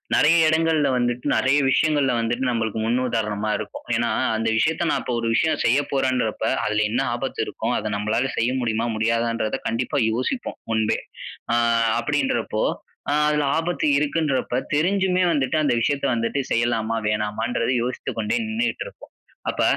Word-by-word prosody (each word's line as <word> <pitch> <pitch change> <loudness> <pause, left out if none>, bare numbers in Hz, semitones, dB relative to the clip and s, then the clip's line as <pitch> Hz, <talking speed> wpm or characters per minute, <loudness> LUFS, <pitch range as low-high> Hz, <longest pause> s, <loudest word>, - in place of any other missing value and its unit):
நெறைய 155 +3 +5
இடங்கள்ல 160 -2 +2
வந்துட்டு 120 0 -1
நெறைய 135 +2 +3
விஷயங்கள்ல 145 -1 +2
வந்துட்டு 120 +3 -1
நம்மளுக்கு 110 -2 -1
முன் 120 +3 +1
உதாரணமா 105 -2 -1
இருக்கும். 105 - -7
ஏனா 115 0 +1 0.3
அந்த 115 0 -1
விஷயத்த, 160 +8 +1
நான் - - 0
இப்ப 125 - -3
ஒரு 115 - -2
விஷயம் 155 +6 +1
செய்ய 120 +4 +4
போறேன்றப்ப 130 -5 0 0.2
அதுல 105 0 +1
என்ன 125 +4 +1
ஆபத்து 130 +2 -5
இருக்கும்? - - -3
அத 105 0 -3
நம்மளால 110 +6 0
செய்ய 115 +2 +1
முடியுமா? 115 0 0
முடியாதான்றத 115 0 0
கண்டிப்பா 120 +4 -1
யோசிப்போம், 130 - -3
முன்பே. 110 -1 +1 0.5
அ - - +3 0.4
அப்படின்றப்போ - - -1 0.5
அ - - +2
அதுல 150 0 +1
ஆபத்து 165 0 -1
இருக்குன்றப்ப 145 -4 0 0.2
தெரிஞ்சுமே 185 +3 +2
வந்துட்டு 135 -3 0
அந்த 145 - +2
விஷயத்த 140 +4 0
வந்துட்டு 115 +4 -1
செய்யலாமா, 115 -1 +1
வேணாமான்றத 105 +3 -1
யோசித்து 125 +1 -4
கொண்டே 105 -1 0
நின்னுகிட்டு 230 +2 -2
இருப்போம். - - -14 0.4
அப்ப, - - -1
120 Hz, 150 wpm, -23 LUFS, 115-145 Hz, 0.5 s, நெறைய